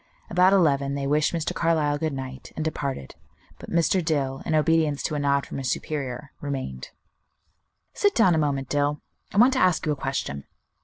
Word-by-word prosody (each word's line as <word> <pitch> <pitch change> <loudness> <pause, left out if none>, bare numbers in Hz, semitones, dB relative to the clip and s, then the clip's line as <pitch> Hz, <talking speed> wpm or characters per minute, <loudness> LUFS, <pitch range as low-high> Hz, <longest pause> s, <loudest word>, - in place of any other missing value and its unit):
About 180 +2 +5
eleven 140 -7 +2
they 140 -1 -3
wished 150 +2 +2
Mr. 165 -2 -2
Carlyle 155 -3 +1
good 160 0 -1
night, 130 -1 -7
and 155 - -3
departed, 140 - -4 0.5
but - - -10
Mr. 170 +2 +2
Dill, 140 -4 -1
in 155 - +1
obedience 155 -2 +2
to - - -2
a 150 - -1
nod 140 -1 +1
from - - -6
his 130 -2 -2
superior, 140 -2 -4
remained. 130 - -5 1.0
"Sit 410 -1 +1
down 190 -7 +5
a 160 - +2
moment, 140 -3 -1
Dill; 145 +1 0 0.3
I - - -5
want 245 +5 +6
to 260 - +1
ask 180 -3 +2
you 155 - +1
a - - 0
question. 135 - -4
145 Hz, 190 wpm, -25 LUFS, 140-165 Hz, 1.0 s, want